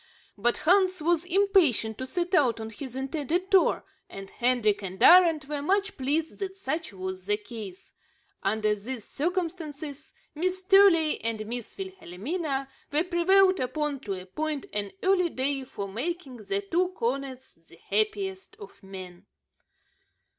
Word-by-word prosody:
But 235 Hz, +4 st, +1 dB
Hans 370 Hz, +1 st, +4 dB
was 335 Hz, +1 st, +1 dB
impatient 355 Hz, -, +3 dB
to 260 Hz, -, -4 dB
set 355 Hz, +4 st, -2 dB
out 260 Hz, -10 st, +3 dB
on 220 Hz, 0 st, -6 dB
his 255 Hz, +2 st, -8 dB
intended 305 Hz, +7 st, -2 dB
tour, 385 Hz, -2 st, +4 dB, 0.2 s
and 195 Hz, 0 st, -9 dB
Hendrik 240 Hz, -5 st, +1 dB
and 190 Hz, -1 st, -6 dB
Arend 340 Hz, -4 st, +7 dB
were 290 Hz, +1 st, -4 dB
much 390 Hz, +5 st, 0 dB
pleased 300 Hz, +4 st, -1 dB
that 385 Hz, -1 st, -4 dB
such 320 Hz, -, -3 dB
was 185 Hz, -1 st, -6 dB
the 205 Hz, 0 st, +2 dB
case. 210 Hz, -3 st, -10 dB, 0.5 s
Under 215 Hz, +1 st, +1 dB
these 220 Hz, +2 st, -6 dB
circumstances, 315 Hz, -3 st, -4 dB, 0.2 s
Miss 370 Hz, +4 st, -1 dB
Truey 375 Hz, -5 st, +5 dB
and 225 Hz, -1 st, -2 dB
Miss 240 Hz, +1 st, -6 dB
Wilhelmina 310 Hz, -, -4 dB, 0.2 s
were 300 Hz, +3 st, +3 dB
prevailed 370 Hz, +2 st, +4 dB
upon 285 Hz, +2 st, -2 dB
to 200 Hz, -7 st, -4 dB
appoint 290 Hz, +11 st, -4 dB
an 205 Hz, -1 st, -3 dB
early 370 Hz, -2 st, +3 dB
day 270 Hz, -1 st, -1 dB
for 200 Hz, -5 st, -6 dB
making 270 Hz, -, -4 dB
the 395 Hz, -, -2 dB
two 365 Hz, -2 st, +1 dB
cornets 260 Hz, +1 st, -3 dB
the -, -, -21 dB
happiest 400 Hz, -2 st, -2 dB
of 420 Hz, -, -13 dB
men. 190 Hz, -1 st, -10 dB
295 Hz, 140 wpm, -27 LUFS, 225-365 Hz, 0.5 s, Arend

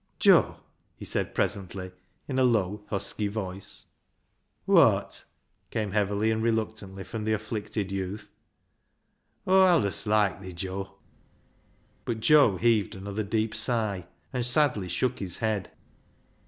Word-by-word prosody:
" -, -, -43 dB
Joe," -, -, +5 dB, 0.4 s
he -, -, -10 dB
said -, -, -2 dB
presently, 95 Hz, -2 st, -2 dB, 0.4 s
in 130 Hz, -2 st, -1 dB
a -, -, +4 dB
low, 105 Hz, -4 st, +1 dB
husky 100 Hz, +1 st, -2 dB
voice. 100 Hz, -2 st, -5 dB, 0.4 s
" -, -, -46 dB
Wot? -, -, +3 dB, 0.2 s
" -, -, -45 dB
came 105 Hz, -3 st, -2 dB
heavily 105 Hz, +1 st, +1 dB
and 110 Hz, 0 st, 0 dB
reluctantly 110 Hz, -4 st, -2 dB
from 110 Hz, +2 st, -6 dB
the 110 Hz, 0 st, +1 dB
afflicted 105 Hz, -2 st, -3 dB
youth. 100 Hz, +2 st, -5 dB, 0.6 s
" -, -, -46 dB
Aw 190 Hz, 0 st, +6 dB
allis 150 Hz, -, +2 dB
loiked 105 Hz, -2 st, +2 dB
thee, 95 Hz, -1 st, -8 dB
Joe." 95 Hz, +2 st, -5 dB, 1.1 s
But 115 Hz, -2 st, -3 dB
Joe 140 Hz, -6 st, +5 dB
heaved 110 Hz, -2 st, +2 dB
another 100 Hz, +2 st, -4 dB
deep 110 Hz, +2 st, -1 dB
sigh, 110 Hz, -6 st, -1 dB, 0.3 s
and 125 Hz, -, -1 dB
sadly 125 Hz, -6 st, +2 dB
shook 125 Hz, +8 st, -1 dB
his 90 Hz, -3 st, -4 dB
head. 110 Hz, -4 st, -1 dB
105 Hz, 140 wpm, -27 LUFS, 95-110 Hz, 1.1 s, Aw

